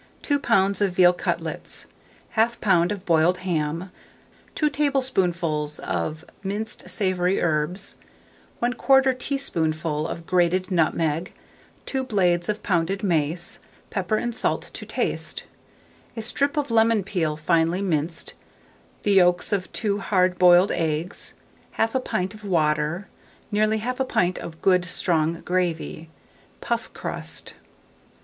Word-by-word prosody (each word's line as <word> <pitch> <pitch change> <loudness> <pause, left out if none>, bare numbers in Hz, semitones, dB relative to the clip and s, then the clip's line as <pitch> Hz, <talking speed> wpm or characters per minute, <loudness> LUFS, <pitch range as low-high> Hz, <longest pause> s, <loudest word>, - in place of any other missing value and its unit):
2 285 -1 +1
lbs. 200 -6 +2
of 195 -3 +2
veal 180 -1 +6
cutlets, 175 - -4 0.5
1/2 235 +2 +2
lb. 175 -4 +3
of 200 -2 -5
boiled 170 +2 +3
ham, 165 +1 -1 0.6
2 305 - +2
tablespoonfuls 180 - 0
of 155 0 -3 0.2
minced 210 +3 -4
savoury 185 -2 +1
herbs, 165 +4 -1 0.7
1/4 265 +2 +4
teaspoonful 160 - -1
of 170 0 -6
grated 180 +1 +1
nutmeg, 165 -1 +1 0.5
2 265 -1 -2
blades 180 -7 +1
of 210 0 -2
pounded 190 +2 0
mace, 165 -2 -1 0.3
pepper 195 +1 0
and 240 +2 -1
salt - - 0
to - - -7
taste, - - -1 0.7
a 225 - -3
strip 280 +6 0
of 285 -4 0
lemon 225 -2 +4
peel 165 -6 -1
finely 165 +3 +1
minced, 165 -2 -1 0.7
the 205 - +2
yolks 180 -1 +4
of 185 -2 -1
2 205 -2 -1
hard 185 -2 +1
boiled 180 +2 +6
eggs, 165 +1 -2 0.4
1/2 240 +3 +1
pint 185 +2 -2
of 215 0 -13
water, 155 0 0 0.4
nearly 215 +1 +2
1/2 250 +3 -1
pint 180 0 +1
of 165 -1 -9
good 180 -2 +4
strong 165 -1 0
gravy, 170 -3 -2 0.5
puff - - -2
crust. - - -5
180 Hz, 125 wpm, -24 LUFS, 165-210 Hz, 0.7 s, veal